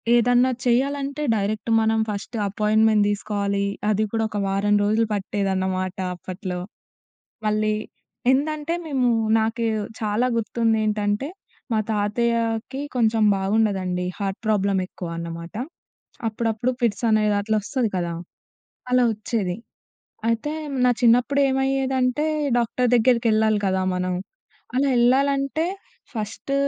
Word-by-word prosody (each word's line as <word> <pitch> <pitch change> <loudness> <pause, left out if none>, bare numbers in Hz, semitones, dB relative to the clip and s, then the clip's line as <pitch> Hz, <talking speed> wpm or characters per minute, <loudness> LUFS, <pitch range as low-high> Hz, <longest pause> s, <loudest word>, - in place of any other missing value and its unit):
ఏదన్నా 245 +2 +4 0.2
చెయ్యాలంటే 275 +4 0
డైరెక్ట్ 210 +2 -2
మనం 220 0 +2
ఫస్ట్ 210 +3 -5
అపాయింట్‌మెంట్ 215 +1 +3
దీసుకోవాలి. 200 -1 -1 0.3
అది 215 +1 +1
కూడా 225 0 +1
ఒక 210 -1 -3
వారం 200 +1 +2
రోజులు 220 +2 +2
పట్టేదన్నమాట 190 -1 -1 0.2
అప్పట్లో. 185 0 -5 0.9
మళ్ళీ 215 0 +1 0.6
ఏందంటే, 300 +3 0
మేము 260 -4 +1 0.3
నాకు 225 +1 -1 0.4
చాలా 215 +3 +1
గుర్తుందేంటంటే, 215 +1 0 0.4
మా 220 - +2
తాతయ్యాకి 225 +4 0
కొంచం 225 -2 +2
బాగుండదండి, 190 -3 0
హార్ట్ 195 -1 -2
ప్రాబ్లమెక్కువ 195 -4 0
అన్నమాట. 170 +2 -6 0.7
అప్పుడప్పుడు 225 +2 -1
ఫిట్సనేది 215 -1 +2
అట్లొస్తది 220 +3 0
కదా! 175 -2 -1 0.8
అలా 250 0 +4
ఒచ్చేది. 210 -4 -2 0.7
అయితే, 230 +6 0 0.3
నా 250 - +5
చిన్నప్పుడేమయ్యేదంటే, 265 +2 +2 0.3
డాక్టర్ 240 +1 +1
దగ్గరికెళ్ళాలి 225 -3 +3
కదా 190 0 +1
మనం. 180 0 -1 0.6
అలా 275 +2 +2
యెళ్ళాలంటే, 275 +5 +2 0.5
ఫస్ట్ 220 +4 -4
220 Hz, 95 wpm, -23 LUFS, 205-245 Hz, 0.9 s, నా